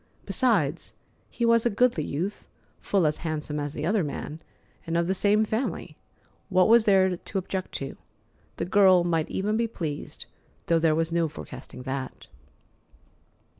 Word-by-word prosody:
Besides, 175 Hz, -, 0 dB, 0.3 s
he 235 Hz, -, -2 dB
was 230 Hz, -1 st, +4 dB
a 240 Hz, -, +3 dB
goodly 235 Hz, -6 st, +2 dB
youth, 175 Hz, +9 st, -4 dB, 0.3 s
full 195 Hz, -4 st, +1 dB
as 150 Hz, 0 st, +1 dB
handsome 150 Hz, -2 st, -3 dB
as 145 Hz, +1 st, -4 dB
the 150 Hz, -, -3 dB
other 200 Hz, +1 st, +2 dB
man, 150 Hz, +2 st, -5 dB, 0.5 s
and 165 Hz, +1 st, 0 dB
of 170 Hz, -, +2 dB
the 190 Hz, -, +1 dB
same 210 Hz, +3 st, +3 dB
family. 220 Hz, +5 st, -3 dB, 0.5 s
What 185 Hz, -1 st, +4 dB
was 230 Hz, 0 st, +6 dB
there 190 Hz, -2 st, +4 dB
to 195 Hz, -, -6 dB
object 190 Hz, 0 st, -3 dB
to? 135 Hz, 0 st, -5 dB, 0.6 s
The -, -, -2 dB
girl 185 Hz, -1 st, +5 dB
might 165 Hz, -2 st, 0 dB
even 210 Hz, +3 st, -1 dB
be 230 Hz, 0 st, +1 dB
pleased, 160 Hz, -9 st, -6 dB, 0.4 s
though 165 Hz, -1 st, +3 dB
there 160 Hz, -1 st, +3 dB
was 165 Hz, +1 st, 0 dB
no 170 Hz, -1 st, +1 dB
forecasting 100 Hz, -, -10 dB
that. 130 Hz, 0 st, -5 dB
180 Hz, 160 wpm, -26 LUFS, 155-205 Hz, 0.6 s, was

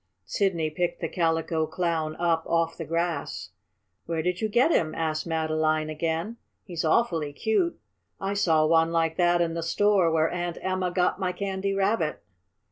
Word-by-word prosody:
Sidney 170 Hz, -6 st, 0 dB
picked 175 Hz, +3 st, -2 dB
the 165 Hz, -, -2 dB
Calico 165 Hz, -1 st, 0 dB
Clown 160 Hz, -3 st, -1 dB
up 170 Hz, -1 st, +1 dB
off 165 Hz, 0 st, +1 dB
the 165 Hz, -, -6 dB
grass. 165 Hz, -2 st, -2 dB, 0.6 s
"Where 165 Hz, -1 st, -1 dB
did 180 Hz, +1 st, -1 dB
you 220 Hz, -, 0 dB
get 245 Hz, +9 st, +3 dB
him?" 160 Hz, -, +1 dB
asked 155 Hz, 0 st, -2 dB
Madeline 155 Hz, -1 st, 0 dB
again. 165 Hz, +8 st, -2 dB, 0.3 s
"He's 175 Hz, -4 st, -4 dB
awfully 160 Hz, -4 st, +1 dB
cute. 220 Hz, -, 0 dB, 0.4 s
I 195 Hz, +1 st, -2 dB
saw 160 Hz, -6 st, +3 dB
one 165 Hz, +1 st, +3 dB
like 165 Hz, -1 st, +1 dB
that 175 Hz, -1 st, +3 dB
in 165 Hz, -1 st, 0 dB
the 165 Hz, -, -3 dB
store 195 Hz, +1 st, +3 dB
where 160 Hz, 0 st, +2 dB
Aunt 175 Hz, -1 st, -3 dB
Emma 185 Hz, -1 st, 0 dB
got 180 Hz, +1 st, +1 dB
my 185 Hz, -2 st, 0 dB
Candy 195 Hz, +1 st, -2 dB
Rabbit." 195 Hz, -5 st, 0 dB
170 Hz, 165 wpm, -26 LUFS, 160-185 Hz, 0.6 s, get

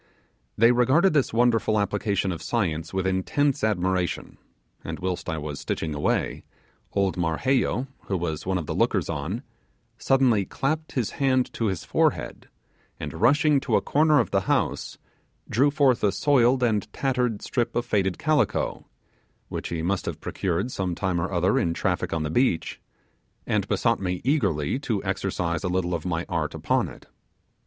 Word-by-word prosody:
They 115 Hz, +2 st, +6 dB
regarded 135 Hz, +10 st, +4 dB
this 140 Hz, -4 st, +2 dB
wonderful 115 Hz, -2 st, +2 dB
application 100 Hz, -1 st, 0 dB
of 85 Hz, -2 st, -5 dB
science 80 Hz, -6 st, -1 dB
with 95 Hz, -1 st, -1 dB
intense 105 Hz, +10 st, 0 dB
admiration; 95 Hz, -4 st, -1 dB, 0.4 s
and -, -, -5 dB
whilst 90 Hz, -1 st, -3 dB
I 80 Hz, -, -2 dB
was 75 Hz, -2 st, -5 dB
stitching 80 Hz, -1 st, -3 dB
away, 75 Hz, -, -1 dB, 0.5 s
old 100 Hz, -2 st, +1 dB
Marheyo, 120 Hz, +10 st, +1 dB, 0.2 s
who 95 Hz, -, -1 dB
was 80 Hz, -3 st, -3 dB
one 95 Hz, 0 st, 0 dB
of 85 Hz, -, -3 dB
the -, -, -3 dB
lookers -, -, +1 dB
on, -, -, -4 dB, 0.6 s
suddenly 130 Hz, -6 st, +3 dB
clapped 155 Hz, +10 st, -2 dB
his 125 Hz, -6 st, -1 dB
hand 130 Hz, -2 st, +1 dB
to 115 Hz, -, -1 dB
his 95 Hz, -5 st, -3 dB
forehead, -, -, 0 dB, 0.5 s
and -, -, -5 dB
rushing 150 Hz, -1 st, +4 dB
to 135 Hz, -, 0 dB
a -, -, +3 dB
corner 150 Hz, 0 st, +3 dB
of -, -, 0 dB
the -, -, +2 dB
house, -, -, 0 dB, 0.5 s
drew 135 Hz, +6 st, +3 dB
forth 140 Hz, -4 st, +2 dB
a 105 Hz, -, +4 dB
soiled 125 Hz, -1 st, +3 dB
and 105 Hz, -3 st, 0 dB
tattered 125 Hz, -5 st, -1 dB
strip 120 Hz, -4 st, -1 dB
of 120 Hz, -, 0 dB
faded 95 Hz, -5 st, 0 dB
calico 155 Hz, -1 st, 0 dB, 0.6 s
which -, -, -4 dB
he 80 Hz, -1 st, -3 dB
must 95 Hz, +3 st, -1 dB
have -, -, -4 dB
procured 95 Hz, +7 st, -2 dB
some 90 Hz, -5 st, -2 dB
time 90 Hz, -1 st, -1 dB
or 95 Hz, -, -3 dB
other 90 Hz, +2 st, +2 dB
in 85 Hz, -1 st, 0 dB
traffic 90 Hz, -1 st, -1 dB
on 80 Hz, -1 st, -1 dB
the 75 Hz, -, -3 dB
beach 120 Hz, -4 st, 0 dB, 0.6 s
and -, -, 0 dB
besought -, -, +1 dB
me 90 Hz, -2 st, -2 dB
eagerly 105 Hz, -, +1 dB
to 115 Hz, -8 st, -2 dB
exercise 95 Hz, -3 st, -2 dB
a 90 Hz, -, -1 dB
little 90 Hz, -1 st, 0 dB
of 85 Hz, -, -3 dB
my 85 Hz, -1 st, -1 dB
art 85 Hz, -3 st, -2 dB
upon -, -, +1 dB
it. -, -, -14 dB
100 Hz, 165 wpm, -25 LUFS, 90-125 Hz, 0.6 s, They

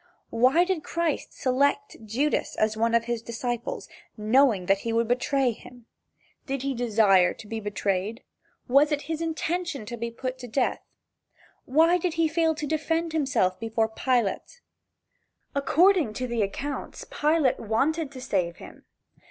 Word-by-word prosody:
Why 255 Hz, +9 st, +4 dB
did 360 Hz, -4 st, -2 dB
Christ 335 Hz, -3 st, -2 dB
select 280 Hz, +2 st, 0 dB
Judas 255 Hz, +8 st, -1 dB
as 215 Hz, 0 st, +1 dB
one 230 Hz, +1 st, +1 dB
of 235 Hz, -, +3 dB
his 235 Hz, -1 st, -2 dB
disciples, 235 Hz, +1 st, -4 dB, 0.3 s
knowing 220 Hz, -2 st, +3 dB
that 195 Hz, +1 st, +3 dB
he 230 Hz, -, -3 dB
would 230 Hz, 0 st, +1 dB
betray 255 Hz, +1 st, +1 dB
him? 245 Hz, +1 st, -13 dB, 0.6 s
Did 270 Hz, -1 st, -3 dB
he 275 Hz, 0 st, -1 dB
desire 215 Hz, -6 st, +3 dB
to -, -, -12 dB
be 225 Hz, +1 st, -4 dB
betrayed? 205 Hz, +1 st, -2 dB, 0.4 s
Was 280 Hz, +4 st, +4 dB
it 295 Hz, -1 st, -1 dB
his 320 Hz, 0 st, -4 dB
intention 330 Hz, -4 st, -2 dB
to 240 Hz, +2 st, -6 dB
be 235 Hz, +1 st, -3 dB
put 255 Hz, +2 st, -5 dB
to 250 Hz, -, -7 dB
death? 250 Hz, +3 st, 0 dB, 0.8 s
Why 325 Hz, +6 st, +4 dB
did 355 Hz, -1 st, -2 dB
he 330 Hz, 0 st, +3 dB
fail 320 Hz, 0 st, +1 dB
to 300 Hz, -, -4 dB
defend 320 Hz, +2 st, -1 dB
himself 260 Hz, -12 st, +1 dB
before 225 Hz, 0 st, 0 dB
Pilate? 245 Hz, -, -1 dB, 0.9 s
According 305 Hz, -, +3 dB
to 255 Hz, -, -3 dB
the 235 Hz, -2 st, -1 dB
accounts, 275 Hz, +8 st, -4 dB
Pilate 300 Hz, -3 st, +1 dB
wanted 275 Hz, +8 st, 0 dB
to 255 Hz, -, -8 dB
save 185 Hz, -9 st, -1 dB
him. -, -, -13 dB
255 Hz, 150 wpm, -26 LUFS, 225-305 Hz, 0.9 s, Why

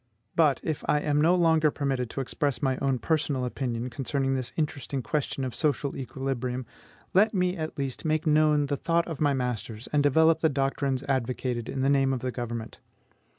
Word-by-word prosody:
But, 155 Hz, -4 st, +4 dB
if 155 Hz, -3 st, -3 dB
I 150 Hz, -, +3 dB
am 150 Hz, 0 st, +1 dB
no 170 Hz, +4 st, +5 dB
longer 160 Hz, -3 st, +4 dB
permitted 135 Hz, -4 st, -2 dB
to 135 Hz, -, -3 dB
express 140 Hz, +2 st, -2 dB
my 130 Hz, -1 st, +2 dB
own 135 Hz, -2 st, 0 dB
personal 145 Hz, -3 st, 0 dB
opinion 125 Hz, -1 st, -3 dB
concerning 135 Hz, +1 st, -1 dB
this 130 Hz, -2 st, -2 dB
interesting 140 Hz, -4 st, -2 dB
question 145 Hz, -1 st, -2 dB
of 125 Hz, -, -4 dB
social 145 Hz, -2 st, 0 dB
equilibrium, 130 Hz, -1 st, -3 dB, 0.5 s
let 210 Hz, +3 st, +4 dB
me, 180 Hz, -1 st, +1 dB
at 155 Hz, -2 st, -5 dB
least, 135 Hz, -3 st, -3 dB
make 155 Hz, 0 st, 0 dB
known 150 Hz, -1 st, +4 dB
the 140 Hz, 0 st, -1 dB
thought 170 Hz, +3 st, +1 dB
of 160 Hz, -4 st, -5 dB
my 145 Hz, -2 st, +3 dB
masters, 120 Hz, -3 st, -3 dB
and 145 Hz, -, +4 dB
develop 160 Hz, +3 st, +4 dB
the 160 Hz, -, +3 dB
doctrines 135 Hz, -1 st, -1 dB
advocated 125 Hz, -3 st, -2 dB
in 135 Hz, -, -2 dB
the -, -, +3 dB
name 135 Hz, -1 st, +3 dB
of 125 Hz, -, -3 dB
the 130 Hz, -, -2 dB
government. 120 Hz, -2 st, -5 dB
140 Hz, 190 wpm, -27 LUFS, 130-155 Hz, 0.5 s, no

